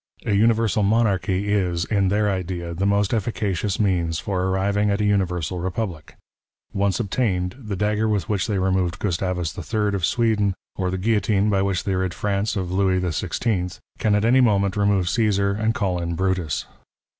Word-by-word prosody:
A 105 - +1
universal 110 +1 +3
monarchy 100 -2 +1
is, 90 -4 0
in 100 -3 +1
their 105 +2 +1
idea, 90 -3 -3
the 95 +4 -1
most 100 0 +1
efficacious 105 -3 -1
means 85 -6 +1
for 95 +3 -2
arriving 100 +2 +1
at 100 +1 0
a 105 - +1
universal 90 -4 0
republic. 90 -2 -4 0.6
Once 100 +1 0
obtained, 95 -4 -1
the 105 -6 -5
dagger 105 +3 0
with 105 -5 0
which 100 -3 0
they 105 - 0
removed 95 -2 0
Gustavus 90 -3 -2
III. 105 -2 -1
of 100 -3 -2
Sweden, 105 -2 +1 0.2
or 95 -1 -1
the 95 - -2
guillotine 105 0 +1
by 100 -1 +2
Avhich 95 -2 0
they 100 - -1
rid 95 -2 -1
France 100 +3 -1
of 95 -3 -3
Louis 95 -1 +2
XVI., 90 +2 -2 0.2
can 105 -2 +2
at 105 +1 +1
any 130 +3 +5
moment 100 -4 +2
remove 100 -3 +2
Ceesar 100 -2 +2
and 110 +3 0
call 90 -4 -1
in 85 0 -2
Brutus. 90 -4 -1
100 Hz, 175 wpm, -23 LUFS, 90-105 Hz, 0.6 s, any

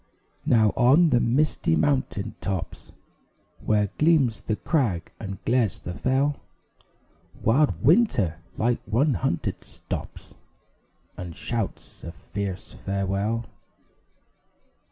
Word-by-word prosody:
Now 110 -3 +4
on 150 +7 +5
the 120 - +4
misty 120 - +1
mountain 110 - 0
tops, 95 -4 -4 0.7
Where 105 -2 +2
gleams 150 -8 +3
the 110 - -1
crag 110 - -1
and 95 -3 -5
glares 120 -5 +2
the 90 - -7
fell, 135 +7 +1 1.1
Wild 140 +7 +2
Winter, 120 - +3 0.2
like 120 +1 +1
one 130 +7 +2
hunted, 105 -12 -2
stops - - -8 0.8
And 90 -2 -7
shouts 115 -5 -5
a 85 - -6
fierce 95 +1 -6
farewell. 100 +4 -2
115 Hz, 100 wpm, -25 LUFS, 100-135 Hz, 1.1 s, on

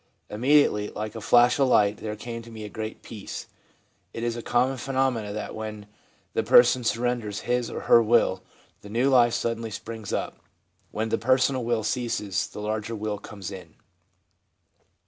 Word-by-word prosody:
Im 105 - -6
mediately, 130 -7 +4
like 105 0 -5
a 115 - -7
flash 120 +4 +4
of 135 - +4
light, 105 -4 +3
there 105 -1 -5
came 115 +2 -7
to 115 - -13
me 110 -1 -8
a 105 - -6
great 110 +1 -6
peace/ 105 -4 -7 0.7
It 115 - -5
is 120 -1 -1
a 120 - -5
common 125 +3 +1
phenomenon 130 -6 -1
that 105 - -5
when 110 -1 -6 0.5
the - - +1
person 125 +1 +5
surrenders 115 -3 -1
his 125 -1 -1
or - - -5
her 115 - +6
will, 110 -4 +2 0.4
the 105 - -11
new 120 +6 +1
life 120 -3 +5
suddenly 115 -1 -2
springs 110 -1 -7
up. - - -3 0.5
When 110 +1 -3
the - - 0
personal 130 +1 +2
will 115 -2 0
ceases, 105 -5 -1
the 105 - -9
larger 110 +2 -3
will 105 -1 -3
comes 100 -3 -8
in. 95 -2 -10
115 Hz, 175 wpm, -26 LUFS, 105-120 Hz, 0.7 s, her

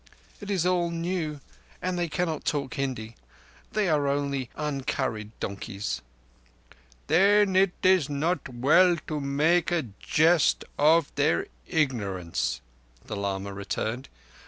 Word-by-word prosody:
It 205 - -8
is 185 -4 +1
all 180 -1 +2
new, 165 -3 -3 0.4
and 185 0 -2
they 175 -1 -1
cannot 165 -3 -2
talk 140 -4 -1
Hindi. 120 -5 -3 0.6
They 210 -2 +1
are 150 -4 +2
only 140 -3 -1
uncurried 130 -7 -2
donkeys." 100 - -4 1.0
"Then 195 +4 +4
it 190 -1 +4
is 185 -6 +4
not 150 +3 -1
well 155 +9 +4
to 155 -1 -3
make 150 +5 +2
a 175 -3 +1 0.2
jest 160 0 +3
of 155 +1 +4
their 145 +3 +1 0.2
ignorance," 100 - -1 0.4
the 105 - -5
lama 100 0 -3
returned. 110 +5 -4
150 Hz, 120 wpm, -27 LUFS, 130-175 Hz, 1.0 s, Then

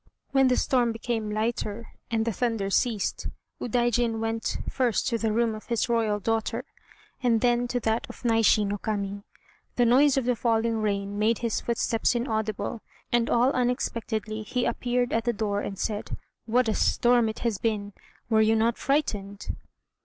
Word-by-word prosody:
When 270 -1 +4
the 250 - +3
storm 245 -3 +2
became 225 -1 -3
lighter 220 0 -2 0.2
and 225 -1 0
the 230 - 0
thunder 225 -4 -1
ceased, 220 -2 0 0.3
Udaijin 240 -1 +1
went 225 0 -2
first 245 -5 0
to 230 -2 -1
the 220 -1 0
room 230 +1 +1
of 215 - -9
his 235 0 0
royal 220 -3 +1
daughter, 225 +2 -1 0.6
and 235 -3 +3
then 245 0 +2
to 245 +1 -1
that 225 +1 0
of - - -11
Naishi 225 -2 +4
no 205 0 -2
Kami. 200 -1 -3 0.5
The 245 - +3
noise 270 +4 +5
of 265 - +1
the 250 0 +2
falling 225 0 +1
rain 200 -1 -1
made 220 +1 +3
his 230 - 0
footsteps 235 0 0
inaudible, 220 -2 -2 0.3
and 240 -1 +2
all 245 +3 +4
unexpectedly 230 -3 -1
he 245 +3 -1
appeared 245 0 0
at 225 0 0
the 240 - +1
door 205 -2 -1
and 195 - -5
said: 210 +1 -3 0.3
"What 245 +2 +2
a 220 - +2
storm 240 0 +3
it 220 - -5
has 220 -5 0
been! 205 -3 -2 0.3
Were 220 -1 +3
you 220 +1 +4
not 225 +1 +1
frightened?" 205 -9 -1
225 Hz, 170 wpm, -27 LUFS, 215-240 Hz, 0.6 s, noise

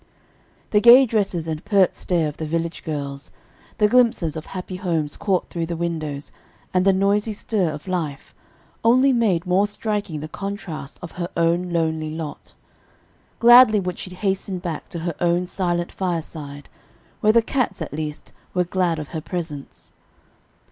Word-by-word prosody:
The 210 - +4
gay 245 +4 +9
dresses 195 -8 -1
and 155 0 -4
pert 200 -3 +3
stare 170 -4 0
of 150 - -6
the 160 - -4
village 165 +1 -2
girls, 140 -3 -4 0.5
the 210 - +4
glimpses 225 -9 +3
of 155 - -6
happy 185 0 -6
homes 165 -6 -1
caught 195 -3 0
through 165 -1 -2
the 170 -1 -3
windows, 155 -4 -4 0.4
and 185 0 +2
the 195 - +6
noisy 200 +3 +1
stir 200 -4 -1
of 150 +4 -8
life, 160 -7 -3 0.5
only 255 +4 +5
made 200 -8 +2
more 185 +3 +3
striking 205 -6 -3
the 155 - -6
contrast 175 -5 -6
of 170 - -7
her 175 - -2
own 170 +2 +2
lonely 160 -2 0
lot. 155 -1 -7 0.8
Gladly 240 -2 +8
would 180 -2 -4
she - - -6
hasten 190 0 -2
back 175 -3 -5
to - - -6
her 170 - -1
own 175 +1 +2
silent 175 -2 -1
fireside, 160 -5 -4 0.5
where 215 - +4
the 230 0 +5
cats, 255 +2 -1
at - - -5
least, 150 0 -5 0.2
were 180 - +3
glad 175 -2 0
of 150 -2 -6
her 160 - -4
presence. 160 -5 -7
175 Hz, 160 wpm, -22 LUFS, 160-200 Hz, 0.8 s, gay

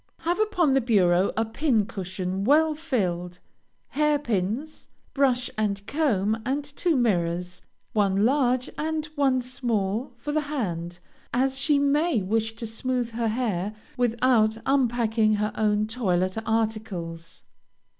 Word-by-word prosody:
Have 345 +4 0
upon 360 -9 +2
the 270 - +3
bureau 190 -5 +3
a 225 - +2
pin 225 -2 +1
cushion 190 -2 -4
well 305 +6 +4
filled, 180 - -2 0.5
hair 300 0 +2
pins, 235 +3 -3 0.3
brush 255 -4 +2
and 200 -2 -1
comb, 220 -8 0
and 275 +4 -1
two 305 +3 0
mirrors, 180 -6 0 0.3
one 200 -1 +2
large, 255 -1 +2
and 310 0 -1
one 270 -4 +2
small 240 -2 -2
for 295 +5 -4
the 310 +1 +1
hand, 175 - -3 0.4
as 265 +1 +1
she 290 +1 +3
may 285 - +2
wish 225 +3 -1
to 230 +1 -6
smooth 240 +2 -2
her 230 0 -1
hair, 215 -4 -1 0.2
without 235 -2 +2
unpacking 235 -5 +2
her 210 0 -1
own 210 -1 +1
toilet 185 -5 0
articles. 210 -7 -3
225 Hz, 130 wpm, -25 LUFS, 200-270 Hz, 0.5 s, well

